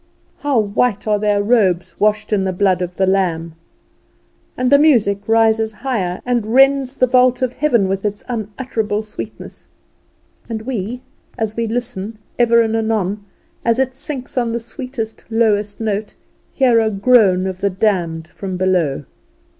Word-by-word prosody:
How 285 -3 0
white 210 0 +1
are 210 -1 +2
their 205 -1 +1
robes, 185 -6 +1
washed 215 +1 +1
in 195 -2 +2
the 190 - 0
blood 185 -1 +1
of 180 0 -4
the 190 - +2
Lamb! 175 -4 0 1.0
And 250 +1 0
the 280 - +7
music 230 -10 +3
rises 225 -1 +2
higher, 210 -7 -2
and 240 -2 -1
rends 270 0 +4
the 255 - +4
vault 255 0 +3
of 250 -1 -1
heaven 245 -10 +2
with 195 0 -2
its 210 -1 -3
unutterable 220 -2 -3
sweetness. 215 0 -9 0.8
And 220 -1 -4
we, 245 0 -4 0.3
as 220 -2 -2
we 230 0 -1
listen, 225 -2 -4 0.2
ever 235 -1 +5
and 225 0 -1
anon, 215 -3 -1 0.4
as 230 0 +2
it 260 -1 0
sinks 265 -1 -4
on 235 -2 -1
the 235 - -2
sweetest, 235 -2 -7
lowest 210 -3 +1
note, 215 -1 -3 0.4
hear 250 -4 +3
a 220 -1 +2
groan 200 -3 +3
of 190 -1 -4
the 200 - +2
damned 180 -5 -1
from 185 +2 -6
below. 180 -7 0
220 Hz, 155 wpm, -18 LUFS, 195-245 Hz, 1.0 s, the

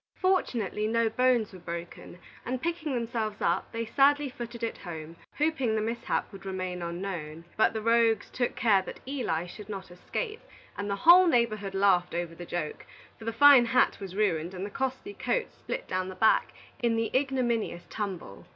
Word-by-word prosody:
Fortunately, 235 - 0
no 230 0 +2
bones 240 -2 +2
were 185 - -10
broken, 170 0 -7 0.3
and 255 +1 -3
picking 320 -2 -2
themselves 225 -3 -2
up, - - 0
they 230 0 -3
sadly 285 +4 +3
footed 235 -1 -7
it 230 - -3
home, 165 -2 -8 0.2
hoping 280 -7 +1
the - - +1
mishap 230 +2 -2
would 195 - -10
remain 185 -2 -4
unknown. 170 -2 -5
But 220 - +3
the 220 -1 -3
rogues 230 -2 +3
took 245 -1 -1
care 205 -5 +4
that - - -9
Eli 245 - -1
should 205 +3 -11
not 195 -3 -7
escape, 430 - -5 0.3
and 200 0 -4
the 200 - 0
whole 360 +2 +9
neighborhood 215 - +1
laughed 185 -3 +3
over 170 -1 -2
the 175 +1 -9
joke; 155 -3 -4 0.3
for 220 - -10
the 230 - -1
fine 270 +1 +8
hat 235 +2 +2
was 190 -1 -7
ruined, 180 -4 0
and 185 +2 -4
the 205 - -7
costly 265 - -3
coat - - -1
split - - -6
down 185 0 -2
the 185 - -8
back, 220 +4 +3 0.3
in 235 -1 +2
the 225 +1 -1
ignominious 245 -9 0
tumble. 190 - -6
220 Hz, 180 wpm, -28 LUFS, 185-250 Hz, 0.3 s, whole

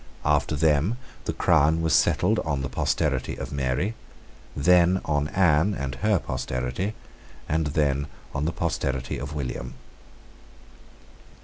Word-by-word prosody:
After 75 0 +2
them 80 +8 +2 0.3
the - - 0
crown 80 +3 +3
was 80 - +1
settled - - +3
on 70 -3 -2
the - - -3
posterity - - 0
of - - -6
Mary, 70 - -1 0.6
then 90 +4 +4
on 75 -1 0
Anne 90 +2 +3
and 70 -4 -3
her 105 -2 +3
posterity, 65 - -3 0.5
and 80 0 0
then 70 -1 0 0.3
on 70 - -1
the 80 - 0
posterity 65 -8 -2
of 70 +3 -6
William. 60 -3 -4
75 Hz, 125 wpm, -25 LUFS, 70-85 Hz, 0.6 s, then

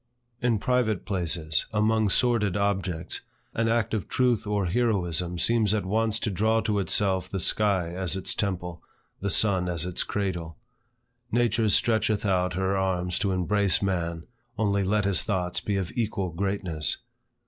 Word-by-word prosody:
In 120 -2 +2
private 120 -3 0
places, 85 -5 +1
among 110 0 +2
sordid 105 -4 +2
objects, 95 -4 -2 0.3
an 115 0 0
act 115 -1 0
of 105 -4 -2
truth 125 -4 +1
or 105 -2 0
heroism 90 -5 0
seems 110 +2 +3
at 105 - -2
once 110 +2 0
to 105 - -1
draw 110 +4 +2
to 105 -2 0
itself 95 0 +1
the 95 - -3
sky 95 -1 +2
as 90 +1 -2
its 95 - -1
temple, 90 -4 -3 0.4
the 100 - -2
sun 95 -4 +3
as 85 -1 -1
its 90 -1 -1
candle. 90 -5 -3 0.7
Nature 115 -2 +2
stretcheth 110 -1 +1
out 90 -2 +1
her 95 +2 0
arms 90 -2 -1
to 100 - 0
embrace 100 +2 +1
man, 85 -4 -2 0.3
only 100 -2 +1
let 105 +1 +1
his 100 -2 +3
thoughts 90 -4 -1
be 100 -1 -1
of 95 -3 -3
equal 105 -6 -2
greatness. 90 -3 -1
100 Hz, 155 wpm, -26 LUFS, 90-110 Hz, 0.7 s, seems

